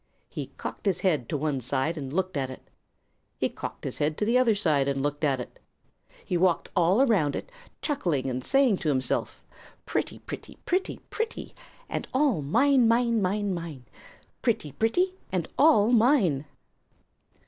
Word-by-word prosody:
He - - -5
cocked - - -6
his 180 -2 +1
head 155 -11 +1
to 150 - -1
one 145 -2 -1
side 135 +6 -1
and 135 -4 -6
looked 185 +2 -1
at 135 -2 -1
it. 130 - -11 0.7
He - - 0
cocked - - -7
his - - -5
head 150 +1 0
to 210 - 0
the 230 +3 +2
other 250 -4 +4
side 155 -9 +2
and 140 -1 0
looked 145 +1 -2
at 135 -3 +2
it. 125 - -8 0.7
He 180 - 0
walked 175 -1 +1
all 185 +7 +4
around 190 - +2
it, - - -6 0.3
chuckling 175 - 0
and 130 -1 -3
saying 270 - +3
to 165 -5 -2
himself, 130 -2 0 0.4
"Pretty, - - -2
pretty, - - -9
pretty, 370 +2 -1
pretty 450 +1 -4 0.3
and - - -4
all 260 - +2
mine, 245 - +4
mine, 235 -1 +3
mine, 200 +1 0
mine! 165 -7 -6 0.6
Pretty, 220 - 0
pretty, 355 - +1 0.2
and 180 -3 -1
all 255 -7 +5
mine!" 220 - +3
185 Hz, 165 wpm, -27 LUFS, 145-235 Hz, 0.7 s, all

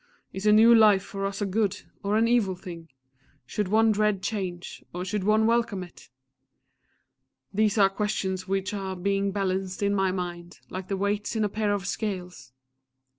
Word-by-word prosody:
Is 190 +2 -3
a - - +7
new 225 +2 +7
life 210 -4 +6
for 195 -1 -4
us 200 +1 -4
a - - 0
good, 205 0 -1 0.2
or 205 +1 0
an 225 +1 +3
evil 225 -6 +2
thing? 170 -2 -10 0.6
Should 205 +9 -2
one 220 +3 +4
dread 210 -2 +1
change, 185 -5 -4
or 180 +1 -3
should 205 +1 -2
one 215 +2 +3
welcome 230 -4 +1
it? 175 -7 -15 1.4
These 210 +1 +2
are 200 -2 +6
questions 195 -2 -2
which 195 +1 -1
are 190 -2 -4
being 195 +2 0
balanced 190 -1 -2
in 200 0 +2
my 195 -2 +1
mind, 175 -2 -6
like 185 0 -5
the 195 - -2
weights 205 +3 -1
in 220 - +1
a 210 - +1
pair 210 0 -1
of 200 -2 -1
scales! 180 - -4
195 Hz, 180 wpm, -26 LUFS, 185-210 Hz, 1.4 s, a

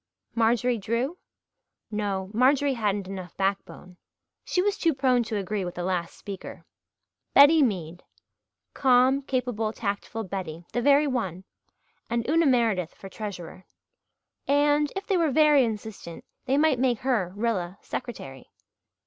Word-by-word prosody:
Marjorie 235 +1 +2
Drew? 240 - -2 0.7
No, 200 -2 -2
Marjorie 270 +4 +3
hadn't 205 -4 -1
enough 185 -2 -8
backbone. 195 -2 -3 0.5
She - - -1
was 405 +2 +2
too 330 -7 +1
prone 255 -2 +2
to 220 -1 -3
agree 200 0 -2
with 175 -1 -5
the 175 - -4
last 175 -2 -2
speaker. 200 -2 -9 0.7
Betty 295 +3 +8
Mead 180 - -1 0.7
calm, 260 +1 +4
capable, 245 -5 -2
tactful 215 +1 -4
Betty 180 -4 -6
the 240 - 0
very 285 +3 +5
one! 195 - -2 0.7
And 235 0 -1
Una 325 +2 +3
Meredith 225 -9 +1
for 195 - -11
treasurer; 185 -3 -8 0.8
and, 290 +1 +3
if 390 +1 -4
they 390 - +1
were 330 -3 +2
very 295 -1 +5
insistent, 215 -6 -6 0.2
they 270 +2 +1
might 295 -4 +3
make 245 -3 +1
her, 235 -9 0
Rilla, 200 -5 -2
secretary. 135 - -7
230 Hz, 135 wpm, -26 LUFS, 195-270 Hz, 0.8 s, Betty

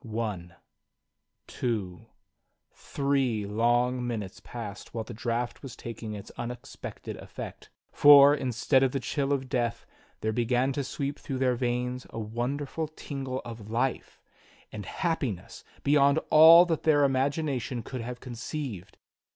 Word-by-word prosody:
One, 105 -7 -4 0.9
two, 100 -8 -3 0.7
three 135 -6 -1
long 120 +4 +1
minutes 105 -5 -5
passed 110 -2 -8
while 115 - -2
the 120 - -9
draught 120 +1 -3
was 130 -5 -8
tak 115 -1 -8
ing 110 -2 -5
its 105 +1 -9
unexpected 120 +1 -7
effect; - - -9 0.2
for, 145 0 +8
instead 130 -1 +1
of 135 -1 +2
the 135 - 0
chill 135 +3 -2
of 135 -2 0
death 120 -3 -1 0.4
there 110 0 -1
began 125 +3 +1
to 140 - -2
sweep 140 +2 -4
through 135 - -4
their 130 -1 +2
veins 125 +1 -2
a - - -9
wonderful 130 +8 -3
tingle 135 -4 -5
of 110 -3 -8
life 125 +4 -2 0.5
and 105 -2 -7
happiness 135 - -3 0.2
beyond 140 0 +4
all 165 +3 +9
that 165 -3 -1
their 150 -3 +4
imagination 135 -3 0
could 130 +2 -6
have 125 +1 -6
conceived. 120 - -6
125 Hz, 135 wpm, -28 LUFS, 115-140 Hz, 0.9 s, all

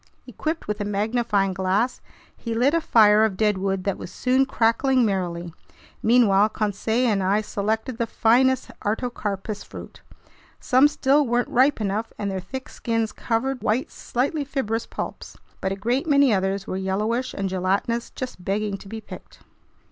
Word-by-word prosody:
Equipped 320 +1 -4
with 210 0 -3
a - - 0
magnifying 205 -1 0
glass, 190 +6 0 0.3
he 230 -1 -5
lit 255 +6 +3
a 335 - +2
fire 215 -6 +5
of 210 -4 0
deadwood 195 -3 0
that 200 -1 -2
was 175 - -8
soon 260 +6 +1
crackling 250 +2 +2
merrily. 175 -4 -2 0.5
Meanwhile 215 -3 +4
Conseil 220 +3 -1
and 205 -4 +1
I 195 +3 +2
selected 220 +4 -2
the 235 - 0
finest 255 +4 +2
artocarpus 210 -2 -3
fruit. - - -11 0.6
Some 260 +3 +5
still 290 -1 +2
weren't 240 +1 0
ripe 265 +2 +3
enough, 215 +2 -2
and 200 -1 -2
their 190 - -2
thick 260 +8 -7
skins 225 -2 -2
covered 255 +3 -2
white, 225 +5 0
slightly 280 +5 -2
fibrous 245 -5 -2
pulps. - - -7 0.2
But 190 - -1
a - - -1
great 240 +9 -1
many 280 -5 +4
others 195 0 0
were 185 - -4
yellowish 215 +7 -1
and 195 - -2
gelatinous, 190 +5 -1
just 250 -8 -7
begging 200 +1 -1
to - - -13
be 220 +2 -7
picked. 210 - -12
220 Hz, 160 wpm, -24 LUFS, 195-250 Hz, 0.6 s, fire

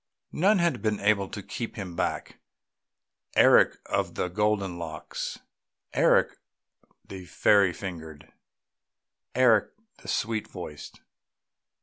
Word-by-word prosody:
None 195 +6 +3
had 170 - 0
been 105 -1 -1
able 100 -1 +1
to 105 - -7
keep 115 +4 -6
him 95 -5 -7
back; - - -3 1.0
Eric - - +5
of - - -2
the 90 - -2
golden 100 -2 -1
locks,... 80 -2 -6 0.6
Eric - - +3 0.7
the 95 -2 -9
fairy 100 +1 +4
fingered,... 80 -5 -9 1.0
Eric 120 -4 +4 0.3
the - - -14
sweet 110 -1 -2
voiced 85 -5 -9
100 Hz, 105 wpm, -27 LUFS, 90-110 Hz, 1.0 s, Eric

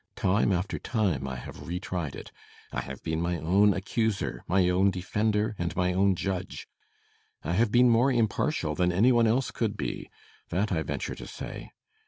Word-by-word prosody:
Time 100 +2 +2
after 90 +2 -1
time 95 - -1
I 65 - -4
have - - -9
re 90 +1 -3
tried 90 -6 -4
it. - - -9 0.4
I - - -2
have - - -8
been 80 0 -1
my 85 0 0
own 95 +6 +4
accuser, 100 - -1
my 90 0 +3
own 95 +2 +3
defender, 105 +3 0
and 85 0 -2
my 90 0 +1
own 95 +1 +3
judge. 95 0 -4 0.8
I 80 - -2
have 110 +3 +2
been 125 +1 +6
more 120 +3 +4
impartial 115 - 0
than 90 +3 +1
any 105 +8 +4
one 120 -2 +4
else 125 +4 +1
could 110 -3 -2
be 65 -5 -4 0.4
that 100 +4 0
I 80 -3 +1
venture 80 - -3
to - - -9
say. - - -7
95 Hz, 185 wpm, -28 LUFS, 90-110 Hz, 0.8 s, been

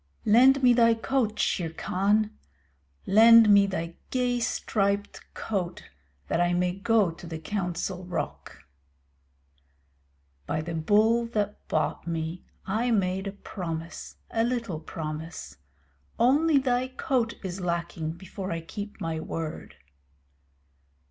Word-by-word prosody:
Lend 260 +5 +6
me 245 -1 +7
thy 230 -1 +5
coat, 225 -1 -1
Shere 170 -3 0
Khan. 205 +6 0 0.7
Lend 225 +2 +8
me 200 -1 +6
thy 170 -3 -4
gay 250 -1 0
striped 200 -3 -1
coat 185 -5 -4 0.4
that 170 - 0
I 175 0 +2
may 180 0 +1
go 200 -1 +2
to 170 +1 -11
the 165 -1 -5
Council 180 +1 -3
Rock. 145 - -5 1.8
By 155 - -1
the 170 +2 -5
Bull 215 +8 +3
that 210 -3 -3
bought - - -1
me 165 +1 -3 0.2
I 220 +5 0
made 190 -3 0
a - - -3
promise 170 -4 -6 0.2
a 225 - +1
little 230 -8 -2
promise. 155 - -7 0.6
Only 290 +5 +4
thy 255 -1 +1
coat 255 -3 -1
is 190 0 -5
lacking 170 -2 -2
before 190 +2 -7
I 165 0 -3
keep 205 +5 -8
my 165 -1 -3
word. 160 - -6
195 Hz, 120 wpm, -27 LUFS, 170-230 Hz, 1.8 s, Lend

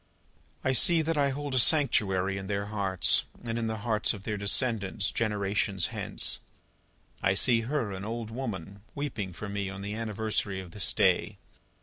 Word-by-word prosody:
"I 130 - +2
see 165 +4 +5
that 165 +1 -1
I 140 -1 +2
hold 140 +1 -4
a 130 - +3
sanctuary 100 - +4
in 95 - -7
their 100 0 -2
hearts, 95 -4 +2 0.2
and 115 -1 -3
in 115 - -2
the 110 0 -3
hearts 110 -1 +1
of 100 - -11
their 105 - -3
descendants, 100 0 0
generations 100 -4 0
hence. - - +1 0.8
I 95 +1 +2
see 115 +3 +5
her, 135 -8 -1
an 95 0 -6
old 115 +1 -5
woman, 100 -6 -6
weeping 130 -10 -4
for 105 +5 -7
me 100 -1 -3
on 100 0 -7
the 100 +1 -4
anniversary 110 -3 -2
of 90 -2 -9
this 100 +1 -2
day. - - +2
105 Hz, 175 wpm, -28 LUFS, 100-120 Hz, 0.8 s, see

